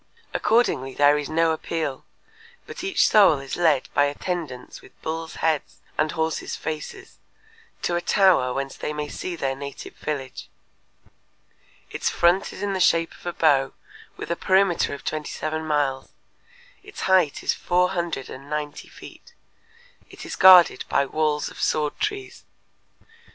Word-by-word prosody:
Accordingly 210 - +1
there 145 0 +5
is 145 -1 -3
no 165 +1 +2
appeal, 160 -3 -3 0.6
but - - -9
each 385 0 +2
soul 200 -8 +6
is 135 0 -6
led 160 -6 +2
by 145 - +4
attendants 145 -3 -5
with - - -19
bulls' 160 0 -4
heads 160 -3 -1 0.2
and 155 0 0
horses' 160 -1 -2
faces 380 - -7 0.6
to 175 - 0
a 175 - 0
tower 175 -9 +3
whence 135 +1 -4
they 150 - -4
may 150 0 -4
see 180 +4 -5
their 135 -4 -2
native 140 0 -8
village. 135 -4 -5 1.4
Its - - -1
front 175 +3 +2
is - - -8
in 200 -1 -1
the 190 - -2
shape 165 -2 +2
of - - -13
a 175 - -2
bow 140 -5 +2 0.4
with - - -6
a - - +1
perimeter 190 -4 +2
of - - -13
twenty 155 -1 -3
seven 155 +1 -4
miles; 145 -3 -1 0.7
its 410 +1 -10
height 185 -6 +2
is - - +1
four 180 +1 +1
hundred 170 -7 -3
and 135 +2 -11
ninety 150 -1 -4
feet. - - -14 0.7
It - - -11
is - - -6
guarded 180 -7 +7
by 140 - +2
walls 150 +1 -1
of - - -10
sword 150 -1 0
trees. 405 -2 -4
155 Hz, 155 wpm, -24 LUFS, 145-175 Hz, 1.4 s, guarded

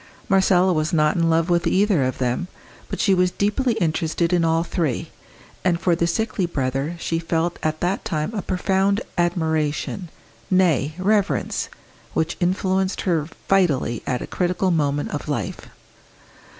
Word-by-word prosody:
Marcella 190 -2 +4
was 155 -1 0
not 150 -2 +3
in 165 -1 +2
love 165 +1 +2
with 175 -1 +2
either 195 -6 +3
of 130 - -2
them, 125 +7 -1 0.4
but - - -4
she 195 - +3
was 180 -1 +3
deeply 210 +7 0
interested 170 -3 0
in 175 -1 +3
all 165 0 +2
three, 165 -7 -2 0.5
and 175 -2 +2
for 170 0 +2
the 170 0 +1
sickly 210 0 -1
brother 135 +1 -2
she 165 0 -2
felt 165 +1 -1
at 155 0 -2
that 180 +3 0
time 155 +4 -2
a 210 - -2
profound 195 +3 +1
admiration 160 0 -1 0.4
nay, 165 -6 +2
reverence 200 +1 0 0.5
which 160 - 0
influenced 185 +1 0
her 165 -5 0 0.2
vitally 150 - +2
at 125 - -1
a - - -4
critical 180 +1 0
moment 145 -3 0
of - - -5
life. - - -3
175 Hz, 150 wpm, -22 LUFS, 155-190 Hz, 0.5 s, Marcella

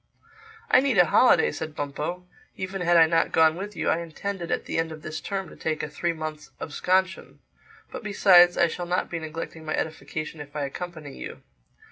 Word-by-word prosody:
"I - - +8
need 260 -5 +1
a 180 - +7
holiday," 250 +9 +4
said 155 -1 -6
Bumpo. 150 +5 -4 0.3
"Even 190 0 -4
had 175 0 +4
I 165 - +8
not 165 0 +1
gone 160 -1 +4
with 205 +3 -6
you, - - -1
I 165 - +2
intended 170 +2 -5
at - - -1
the - - -2
end 165 0 -1
of 155 -1 -9
this 155 0 -5
term 195 -2 -3
to - - -13
take 155 -1 -3
a - - -2
three 175 - -2
months' 155 -2 -6
absconsion—But 185 +4 -3
besides, 185 -4 +6
I - - +5
shall 175 +1 -4
not 180 +1 -1
be 165 - -2
neglecting 160 0 -7
my 155 0 -2
edification 155 0 -4
if 145 0 -11
I 145 -2 -1
accompany 155 -1 -7
you. - - -9
165 Hz, 195 wpm, -26 LUFS, 155-180 Hz, 0.3 s, I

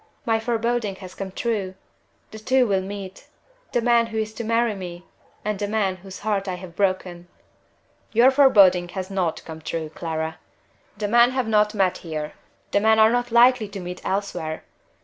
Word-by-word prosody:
My 225 -2 +2
foreboding 230 -2 -1
has 185 -2 -11
come 195 0 -6
true! 200 -3 -2 0.6
The 220 - -9
two 255 +3 +3
will 195 -4 +1
meet 195 0 -8 0.4
the 240 - 0
man 235 -1 +4
who 220 -1 -6
is 215 0 -2
to 235 - -5
marry 230 0 +1
me 180 -3 -8 0.4
and 210 -2 -2
the 205 - -1
man 200 -3 0
whose 190 +1 -11
heart 205 -2 -1
I 185 - -2
have 180 -2 -11
broken!" 185 -3 -1 0.8
"Your 240 +4 +5
foreboding 200 -10 +5
has 190 +1 -4
not 180 -4 -2
come 160 -1 -9
true, 160 0 -4
Clara! 160 -1 -4 0.6
The 205 0 -2
men 235 +3 +5
have 260 -3 -1
not 210 -1 +2
met 190 -3 +1
here 155 -2 -5 0.4
the - - +3
men 220 +1 +4
are 220 0 +6
not 245 0 0
likely 240 -1 +5
to 200 0 -8
meet 180 0 -7
elsewhere. 180 -5 -3
200 Hz, 180 wpm, -23 LUFS, 185-225 Hz, 0.8 s, are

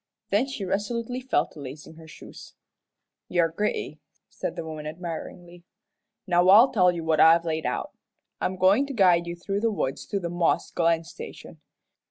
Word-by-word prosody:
Then 210 +7 +2
she 265 -8 -5
resolutely 230 +6 -3
fell 260 - +1
to - - -14
lacing 145 +3 -9
on 160 - -16
her 160 - -13
shoes. 155 - -13 0.7
"You're 170 -2 +2
gritty," 205 +6 -3 0.3
said - - -5
the 165 - -5
woman, 155 -1 -7
admiringly. 175 +1 -8 0.6
"Now 175 0 +3
I'll 225 +7 +8
tell 180 -5 +4
you 170 -2 -5
what 160 -1 +1
I've 165 +2 +6
laid 160 -1 -2
out. - - -3 0.5
I'm 185 - -1
goin' 195 +9 +3
to 280 - -6
guide 180 -6 +4
you 170 - -4
through 195 +3 -3
the 230 - +2
woods 150 -10 -3
to 200 - -2
the 175 - -4
Moss 170 0 0
Glen 165 -1 +1
Station. 460 - -11
175 Hz, 180 wpm, -25 LUFS, 165-205 Hz, 0.7 s, I'll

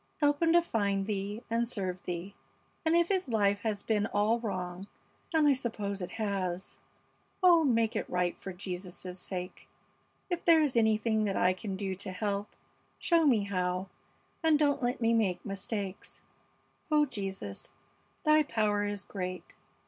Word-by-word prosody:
Help 290 0 +2
him 330 -1 +4
to 345 0 +6
find 200 -8 0
Thee 205 +2 -3
and 230 +1 0
serve 185 -6 -3
Thee, 180 +3 -5 0.5
and 320 +1 +3
if 340 0 +3
his 380 -4 +1
life 205 -4 +2
has 205 -1 -2
been 215 -1 +1
all 215 +3 +2
wrong 185 -3 -4 0.4
and 315 -3 +4
I 285 - +6
suppose 210 -6 -3
it 180 - -5
has 195 -4 -3 0.6
oh, 345 -3 +7
make 230 -5 +2
it - - -2
right 180 -1 0
for 190 - -7
Jesus' 180 0 -6
sake! 180 0 -6 0.6
If 350 -2 -2
there 325 -2 +6
is 280 -4 0
anything 220 -1 +3
that 195 -2 -1
I 180 +1 +4
can 190 +1 -5
do 190 -1 -2
to 190 0 -6
help, 200 +2 -2 0.5
show 335 -3 +3
me 230 -7 +4
how, 185 -1 -1 0.5
and 320 -2 +4
don't 290 -2 +2
let 245 0 -1
me 230 0 +3
make 190 -6 +1
mistakes. 195 -1 -5 0.7
Oh, 300 -1 +4
Jesus, 195 - -6 0.5
Thy 305 -1 +5
power 215 -7 +1
is 205 -1 -3
great. 185 -2 -6
205 Hz, 160 wpm, -31 LUFS, 190-245 Hz, 0.7 s, oh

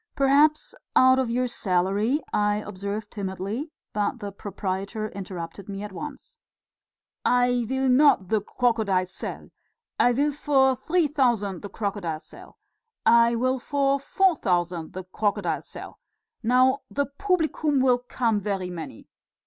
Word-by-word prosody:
"Perhaps 290 +3 +3 0.2
out 260 0 +6
of 260 -3 0
your 250 +2 +1
salary...." 205 - 0
I 205 0 +2
observed 205 +1 -5
timidly, 200 - -4 0.2
but 210 +4 -1
the 205 -3 -6
proprietor 200 +2 -4
interrupted 190 -1 -7
me 200 0 -5
at 210 - -6
once. 295 +9 -9 0.8
"I 245 -1 +2
will 265 0 0
not 255 -8 +4
the 215 -2 +2
crocodile 215 -5 +1
sell; 185 - -7 0.5
I 245 - +5
will 285 +4 +1
for 270 -2 +3
three 325 +7 +1
thousand 240 - 0
the 205 - -7
crocodile 195 -6 -3
sell! - - -15 0.5
I 235 0 +5
will 255 +2 0
for 280 +1 +1
four 365 +4 +2
thousand 175 -5 -1
the 185 - -6
crocodile 200 +3 -1
sell! - - -11 0.4
Now 255 +3 +3
the 285 - 0
publicum 315 -3 0
will 255 -1 +4
come 240 -3 0
very 195 -3 -3
many. 160 -9 -8
230 Hz, 135 wpm, -25 LUFS, 195-265 Hz, 0.8 s, out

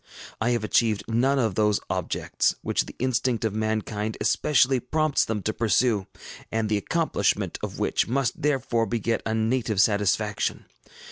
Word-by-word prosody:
I 115 - +2
have 120 -2 0
achieved 110 -1 +1
none 125 +5 +2
of 115 -6 +1
those 105 +1 +2
objects - - -1
which - - 0
the - - -10
instinct 125 -2 0
of 110 - -1
mankind 110 0 -2
especially 135 -3 +3
prompts 155 +4 +1
them 105 -3 -3
to 110 - -1
pursue, 110 -2 +1 0.4
and 110 -1 -1
the 105 - +2
accomplishment 165 +10 0
of - - -5
which - - 0
must 130 0 -1
therefore 125 -5 +1
beget 115 0 -1
a 110 - 0
native 110 -2 0
satisfaction. 105 0 +1
115 Hz, 150 wpm, -25 LUFS, 105-125 Hz, 0.4 s, especially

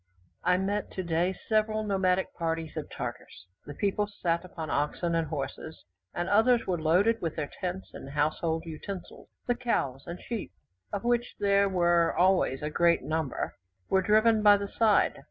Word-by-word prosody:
I 180 0 +3
met, 200 +2 -1
today, 175 0 -1
several 215 0 +1
nomadic 190 -2 +1
parties 165 -1 -3
of - - -5
Tartars. 90 - -7 0.2
The 145 - -7
people 205 +3 0
sat 175 -4 -1
upon 165 -4 -6
oxen 150 +4 0
and 165 -1 +1
horses, 155 +1 -6 0.3
and 175 - -2
others 230 +3 +4
were 175 -3 -1
loaded 195 +9 +3
with 165 -2 -2
their 150 -2 -4
tents 185 +1 -4
and 135 - -9
household 155 +3 0
utensils; 175 +4 -8 0.2
the 245 - +2
cows 140 - -2
and 170 +1 -6
sheep, 225 - -5 0.4
of 205 0 -3
which 240 0 0
there 200 0 +3
were 175 -2 +2
always 180 -7 +3
a 150 - -2
great 170 +1 +3
number, 155 -4 -2 0.4
were 190 - +4
driven 215 +2 +4
by 205 -1 +7
the 200 0 -5
side. 220 -2 +3
180 Hz, 165 wpm, -28 LUFS, 160-205 Hz, 0.4 s, by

